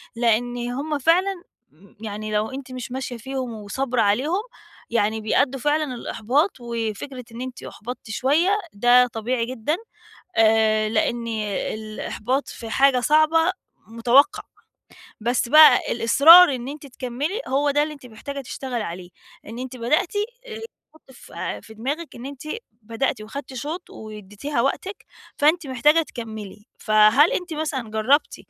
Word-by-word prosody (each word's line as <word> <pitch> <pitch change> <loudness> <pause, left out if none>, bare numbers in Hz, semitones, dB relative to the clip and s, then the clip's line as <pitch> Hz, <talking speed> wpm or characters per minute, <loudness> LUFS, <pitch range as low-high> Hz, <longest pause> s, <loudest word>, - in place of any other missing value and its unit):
لإن 240 +1 +1
هم 290 +4 -3
فعلًا 355 +5 +2 0.6
يعني 215 0 -5
لو 210 +2 0
أنتِ 265 -1 -8
مش 255 -1 -7
ماشية 255 -1 -4
فيهم 260 0 -5
وصابرة 235 +4 -2
عليهم 270 - +1 0.5
يعني 220 -1 0
بيأدّوا 260 +5 +1
فعلًا 295 -1 0
للإحباط، 255 - 0
وفكرة 235 +2 -5
إن 230 +2 -8
أنتِ 255 -1 -7
أُحبَطتِ 240 +1 -8
شوية 285 - +2 0.2
ده 245 +4 +5
طبيعي 230 +1 -2
جدًا، 255 +6 -2 0.6
آآ، 220 -1 +3
لإن 230 +2 0 0.5
الإحباط 220 +4 -3
في 225 - -8
حاجة 270 +2 +4
صعبة، 310 +5 +3 0.4
متوقع. 240 - +3 0.8
بس 240 +2 0
بقى 305 -2 +8
الإصرار 285 +8 +7
إن 250 0 -5
أنتِ 290 0 -8
تكمِلي، 275 - -4
هو 285 +2 +1
ده 290 +1 +2
اللي 305 0 -3
أنتِ 280 -3 -14
محتاجة 265 +5 -7
تشتغلي 250 -3 -5
عليه، 175 0 -7 0.4
إن 225 +2 -8
أنتِ 255 0 -6
بدأتِ 250 +8 0 0.3
اللي 450 -3 -7
يتحط 315 -10 -15
ف 245 - -16 0.3
في 220 - -12
دماغك 285 +9 -4
إن 240 - -8
أنتِ 275 -2 -9 0.4
بدأتي 225 +1 -2
واخدنتِ 270 +4 -8
شُوط 305 +8 -6
واديتيها 215 +5 -5
وقتِك، 375 +10 -2 0.3
فأنتِ 310 +2 +3
محتاجة 295 +5 +3
تكمِلي. 220 -6 -9
فهل 215 +8 +5
أنتِ 360 -1 -3
مثلًا 290 -7 -3
جرّبتِ 220 +7 +2
255 Hz, 135 wpm, -23 LUFS, 225-290 Hz, 0.8 s, بقى